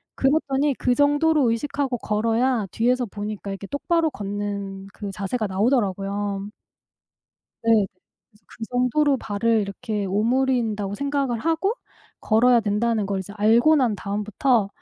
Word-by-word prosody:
그랬더니 280 0 +1
그 250 -1 +1
정도로 290 -2 +3
의식하고 275 +1 -2
걸어야 225 +2 0
뒤에서 245 +2 +1
보니까 205 -1 -6
이렇게 195 0 -7
똑바로 325 +3 0
걷는 200 -3 -5
그 200 -2 -6
자세가 205 +3 -2
나오더라고요. 200 -2 -1 1.1
네. 225 -3 +4
그래서 210 +3 -34
'그 225 - -8
정도로 265 +3 +2
발을 220 +2 +1
이렇게 205 +1 -3
오므린다.'고 220 -1 0
생각을 280 -2 -1
하고 330 +7 0 0.5
걸어야 235 +2 +4
된다는 210 0 0
걸 195 -1 -2
이제 200 +2 -8
알고 235 +9 +4
난 245 -6 +2
다음부터 210 +3 0
225 Hz, 315 characters per minute, -23 LUFS, 205-265 Hz, 1.1 s, 네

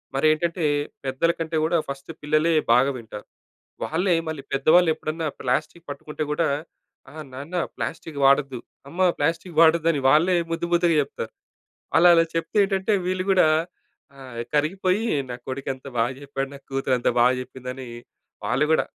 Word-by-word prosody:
మరేంటంటే 155 +4 +1 0.4
పెద్దల 135 +6 +1
కంటే 160 0 -2
కూడా 170 +1 +2
ఫస్ట్ 140 +3 -7
పిల్లలే 155 +3 +2 0.2
బాగా 135 +3 +4
వింటారు. 110 -3 -9 0.6
వాళ్ళే 175 +2 +1
మళ్ళీ 155 -3 -5
పెద్దవాళ్ళేప్పుడన్నా 160 +1 +2
ప్లాస్టిక్ 150 +6 -2
పట్టుకుంటే 150 +2 -5
కూడా 160 +1 +1 0.6
"ఆ! - - -16 0.2
నాన్న 145 +7 -7 0.2
ప్లాస్టిక్ 160 -2 -5
వాడొద్దు, 135 -2 +3 0.3
అమ్మ 180 +3 +2
ప్లాస్టిక్ 165 +2 -1
వాడొద్దని", 165 -2 +4
వాళ్ళే 170 +6 +4 0.2
ముద్దు 170 +1 -2
ముద్దుగా 170 -2 +3
చెప్తారు. 135 -5 -6 0.7
అలా 175 +1 +7
అలా 165 0 +5
చెప్తే 165 +6 -3
ఏంటంటే 195 +2 0
వీళ్ళు 185 +1 -1
కూడా 180 -4 +5 0.7
ఆ! - - -12 0.3
కరిగిపోయి, 185 +7 +1 0.3
"నా - - -3
కొడుకెంత 130 0 -5
బాగా 120 +3 +1
చెప్పాడు, 135 -1 -4
నా - - -9
కూతురెంత 135 -2 0
బాగా 125 +1 +5
చెప్పిందని" 125 0 -8 0.6
వాళ్ళు 125 +7 +1
కూడా - - +3
155 Hz, 135 wpm, -24 LUFS, 135-170 Hz, 0.7 s, అలా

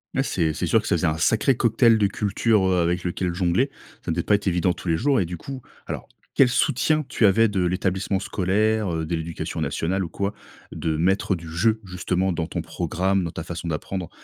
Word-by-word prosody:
Ouais 135 - +3
c'est 85 - 0
c'est - - -2
sûr - - +4
que - - -6
ça - - +2
faisait - - +1
un 80 0 0
sacré 115 +8 +2
cocktail 115 0 +4
de 105 - +3
culture, 105 0 +1
heu, 90 -2 +2
avec 90 +1 0
lequel 90 0 -2
jongler, 95 +10 +1 0.3
ça - - -1
devait 85 - 0
pas 105 - +3
être 100 - -3
évident 90 -1 +2
tous 90 - -7
les 80 - +3
jours 135 - +2
et 95 - +1
du 85 +1 -6
coup 135 +6 -8 0.2
alors - - -5 0.3
quel 130 -2 +6
soutien 145 +5 +2
tu 110 - +2
avais 115 +4 +4
de 100 -3 0
l'établissement 95 +2 0
scolaire, 100 +1 0
heu, 80 -1 -2
de 85 - -1
l'éducation 80 0 -4
nationale 95 +4 -1
ou 85 - -5
quoi? 100 +5 -2 0.4
De 80 -1 -2
mettre 95 +3 +1
du 85 -1 -9
jeu 110 +7 +1
justement 90 0 -1
dans 80 -1 -2
ton - - -3
programme, 95 +1 -1
dans 85 - -2
ta 80 - -6
façon 85 0 -6
d'apprendre, 85 +3 -4
95 Hz, 225 wpm, -24 LUFS, 85-105 Hz, 0.4 s, quel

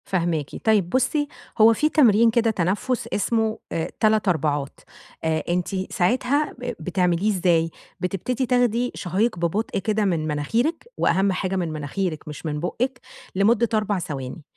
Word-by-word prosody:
فاهماكِ. 170 -5 -1
طيب 210 -6 +3
بُصّي، 260 - +1 0.3
هو 225 +1 +8
في 305 +7 +1
تمرين 235 -7 +5
كده 230 -1 +2
تنفس، 220 +6 -1
اسمه 220 +1 0
آآ 165 - -2
3 215 -1 +3
أربعات، 145 -5 0 0.4
آآ 160 -1 0
أنتِ 180 +2 -2
ساعتها، 255 +10 +1
ب 245 0 -4
بتعمليه 180 +3 +1
إزاي؟ 170 -4 +2 0.3
بتبتدي 205 +8 -2
تاخدي 245 -1 +1
شهيق 195 +3 0
ببطء 185 +7 -1
كده 215 +1 0
من 165 -5 0
مناخيرِك، 225 - -1
وأهم 195 +1 +2
حاجة 185 0 -2
من 175 -4 -1
مناخيرِك، 155 +2 -3
مش 150 +2 -8
من 150 -1 -2
بُقِّك، 245 - -2 0.4
لمدة 220 +4 +3
4 210 -2 +1
ثواني، 145 -3 -6
195 Hz, 145 wpm, -23 LUFS, 170-230 Hz, 0.4 s, هو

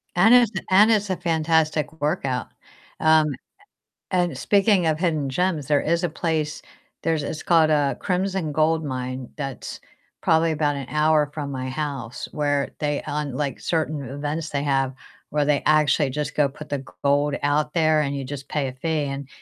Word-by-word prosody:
And 195 +7 +6
it's 245 -3 +6 0.2
and 205 +4 +6
it's 210 -2 +2
a 185 - -1
fantastic 160 -3 +1
workout. 135 -4 -1 0.5
Um, 155 -1 +5 0.9
a - - +2
a - - +5
and 170 -7 -3
speaking 200 +2 +3
of 155 -1 +1
hidden 155 -5 0
gems, 160 0 -1
there 145 0 +3
is 170 +2 0
a - - +2
place, 155 -2 -2 0.4
there's 160 -2 0
it's 150 +2 -5
called, 165 -2 +4
uh, 145 -2 +2
Crimson 185 -3 -1
Gold 160 +1 +2
Mine 130 -2 -4
that's 135 -3 -6 0.4
probably 160 0 +3
about 150 -2 0
an 135 -2 -5
hour 150 -1 +2
from 145 -2 -4
my 130 -1 -4
house 135 -3 -4
where 145 -2 0
they 145 -1 -1
on, 150 -1 -3
like, 140 -2 -3
certain 155 -3 -1
events 145 +4 -4
they 140 -1 -1
have 135 -2 0 0.4
where 150 0 +1
they 145 0 +1
actually 150 -2 +3
just 150 +2 -4
go 145 -2 +3
put 150 +3 -11
the 140 -2 -3 0.2
gold 145 +1 +2
out 150 +1 +1
there 155 -2 +3
and 140 -1 -2
you 135 - -4
just 140 +1 -7
pay 145 -3 -1
a - - -5
fee 155 +3 -1
and 140 -1 -5
150 Hz, 180 wpm, -23 LUFS, 140-160 Hz, 0.9 s, And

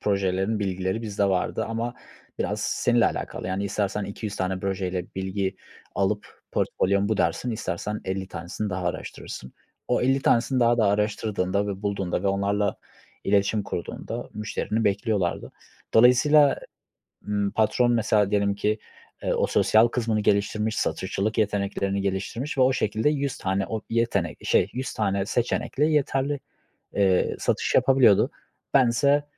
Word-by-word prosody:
projelerin 100 +1 0
bilgileri 95 +1 -2
bizde 105 -2 -1
vardı 95 -2 0
ama 115 +2 -3 0.4
biraz - - -1
seninle 120 -1 +2
alakalı. - - -4
Yani 95 +2 -2
istersen 100 +1 -1
200 100 +1 -5
tane 95 0 -1
projeyle 95 -2 -2
bilgi 95 0 -2 0.4
alıp 100 +2 -2
portfolyo'm 100 +1 +1
bu 110 - +1
dersin, 125 - 0
istersen 105 -1 -3
50 95 0 -3
tanesini 90 +5 -5
daha 90 -1 -3
araştırırsın. 65 -6 -6 0.4
O 125 - +2
50 135 +2 +2
tanesini 125 +2 +2
daha 120 0 +4
da 110 - +4
araştırdığında 100 -1 0
ve 100 0 -5
bulduğunda 100 -3 -1
ve - - 0
onlarla 100 +1 0 0.5
iletişim 100 +1 +2
kurduğunda 85 -3 -5
müşterini 105 +1 -2
bekliyorlardı. 100 -2 0 0.4
Dolayısıyla, 135 +5 +6 0.7
ımm, 100 -1 0
patron 120 +3 +2
mesela 110 -3 +2
diyelim 100 -1 +2
ki, 105 +2 0 0.4
eee, - - 0
o - - +2
sosyal 110 +2 +4
kısmını 115 -2 0
geliştirmiş, 105 +2 +1
satışçılık 100 +3 -1
yeteneklerini 100 -1 0
geliştirmiş 100 +9 -3
ve - - +6
o 130 +1 +5
şekilde 110 +2 +1
100 140 -3 -2
tane 95 +1 -1
o 110 - -3
yetenek 115 -8 0
şey, 90 - +3
100 130 +2 -4
tane 100 -2 0
seçenekle 125 +5 0
yeterli, 145 -2 +1 0.6
eee, 95 -2 +2
satış - - 0
yapabiliyordu. 130 -7 +5 0.4
Bense 140 +3 +4
105 Hz, 135 wpm, -25 LUFS, 95-115 Hz, 0.7 s, Dolayısıyla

